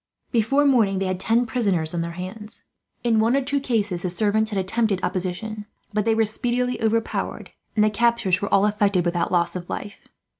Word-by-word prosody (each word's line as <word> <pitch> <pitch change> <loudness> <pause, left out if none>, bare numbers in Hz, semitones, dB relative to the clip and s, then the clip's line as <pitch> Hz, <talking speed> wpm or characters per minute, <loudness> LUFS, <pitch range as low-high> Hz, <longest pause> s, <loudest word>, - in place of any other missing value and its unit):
Before 260 +5 +2
morning 225 -8 +3
they 195 - -1
had 185 -1 -2
ten 230 +5 +2
prisoners 200 -10 0
in 170 - -1
their 170 0 -4
hands. 210 +4 -5 0.4
In 230 -2 +3
one 230 +4 +3
or 275 - +2
two 280 +2 0
cases 210 -9 -1
the 180 - -2
servants 215 +4 +1
had 205 - -3
attempted 195 +1 0
opposition, 195 +4 -3 0.3
but 210 0 0
they 225 -1 +3
were 225 0 +3
speedily 245 +3 -1
overpowered, 225 0 -1 0.2
and 210 - +4
the 215 - +3
captures 225 -4 +2
were 200 - -3
all 200 +1 +4
effected 205 -4 +2
without 175 0 0
loss 170 -1 +1
of 175 -1 -6
life. 205 +1 -6
210 Hz, 195 wpm, -23 LUFS, 185-230 Hz, 0.4 s, and